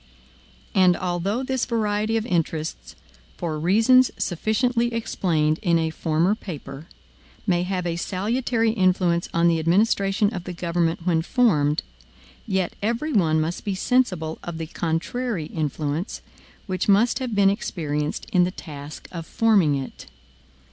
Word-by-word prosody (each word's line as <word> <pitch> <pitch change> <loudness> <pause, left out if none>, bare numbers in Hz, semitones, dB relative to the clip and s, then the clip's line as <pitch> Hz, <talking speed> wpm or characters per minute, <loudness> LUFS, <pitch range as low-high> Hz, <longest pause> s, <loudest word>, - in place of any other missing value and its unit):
And 185 -2 +4
although 185 +7 -1
this 260 -1 -1
variety 215 -1 0
of 220 - -2
interests, 160 - -2 0.4
for 160 -3 -3
reasons 225 +9 +5
sufficiently 235 +6 0
explained 160 -8 0
in 170 -5 +3
a 160 -1 0
former 165 +4 +1
paper, 160 - -8 0.6
may 175 -4 +2
have 180 0 -2
a 170 -1 -1
salutary 225 +5 0
influence 185 -4 +1
on 170 0 +3
the 165 -1 +3
administration 200 +4 +2
of 180 -3 -5
the 180 - -5
government 170 -1 -1
when 165 -3 +2
formed, 160 - +2 0.6
yet 190 -4 0
every 235 +9 -1
one 160 -6 +3
must 160 +3 -2
be 200 -2 -2
sensible 185 -8 0
of 170 -2 -5
the 165 - -4
contrary 170 +5 -2
influence, 155 - -3 0.4
which 185 0 -2
must 215 +7 +4
have 250 -4 -3
been 195 -1 +5
experienced 150 -7 -3
in 180 - +5
the 175 - +1
task 150 -5 -9
of 165 -2 -7
forming 200 -10 +3
it. 135 -2 -6
180 Hz, 140 wpm, -24 LUFS, 165-215 Hz, 0.6 s, reasons